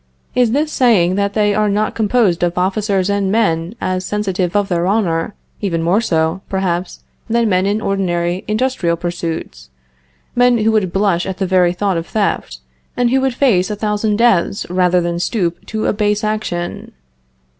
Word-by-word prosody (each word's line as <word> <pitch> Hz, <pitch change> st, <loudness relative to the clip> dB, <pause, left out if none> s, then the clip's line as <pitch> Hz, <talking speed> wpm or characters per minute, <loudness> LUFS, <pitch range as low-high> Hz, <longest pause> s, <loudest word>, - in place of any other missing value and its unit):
Is 245 Hz, -2 st, +3 dB
this 300 Hz, +4 st, 0 dB
saying 210 Hz, -, +3 dB
that 200 Hz, 0 st, 0 dB
they 210 Hz, -1 st, +2 dB
are 210 Hz, 0 st, +1 dB
not 210 Hz, +1 st, 0 dB
composed 215 Hz, -5 st, +1 dB
of 175 Hz, 0 st, 0 dB
officers 195 Hz, +1 st, 0 dB
and 200 Hz, -1 st, 0 dB
men 180 Hz, -4 st, 0 dB
as 185 Hz, 0 st, -2 dB
sensitive 190 Hz, -2 st, -2 dB
of 205 Hz, -1 st, +2 dB
their 175 Hz, -1 st, 0 dB
honor, 190 Hz, -4 st, 0 dB, 0.3 s
even 170 Hz, -5 st, -1 dB
more 185 Hz, +6 st, +2 dB
so, 165 Hz, -3 st, 0 dB
perhaps, 185 Hz, -2 st, -2 dB, 0.3 s
than 235 Hz, 0 st, +2 dB
men 185 Hz, -1 st, +2 dB
in 205 Hz, +2 st, 0 dB
ordinary 180 Hz, -3 st, -1 dB
industrial 215 Hz, -7 st, 0 dB
pursuits 165 Hz, -, -5 dB, 0.7 s
men 245 Hz, 0 st, +4 dB
who 220 Hz, 0 st, +2 dB
would 210 Hz, -5 st, +1 dB
blush 195 Hz, -3 st, +1 dB
at 190 Hz, -1 st, -4 dB
the 195 Hz, -, -1 dB
very 180 Hz, -1 st, +3 dB
thought 190 Hz, 0 st, -1 dB
of 165 Hz, -, -4 dB
theft, 200 Hz, -, -2 dB, 0.4 s
and 245 Hz, -1 st, +2 dB
who 265 Hz, +1 st, +3 dB
would 265 Hz, -2 st, 0 dB
face 220 Hz, -9 st, +2 dB
a 210 Hz, -, -2 dB
thousand 210 Hz, 0 st, -1 dB
deaths 210 Hz, -4 st, +2 dB
rather 180 Hz, 0 st, +2 dB
than 170 Hz, 0 st, -2 dB
stoop 175 Hz, -3 st, -1 dB
to 220 Hz, 0 st, -3 dB
a -, -, +2 dB
base 210 Hz, 0 st, 0 dB
action? 210 Hz, -5 st, -3 dB
195 Hz, 175 wpm, -17 LUFS, 175-215 Hz, 0.7 s, men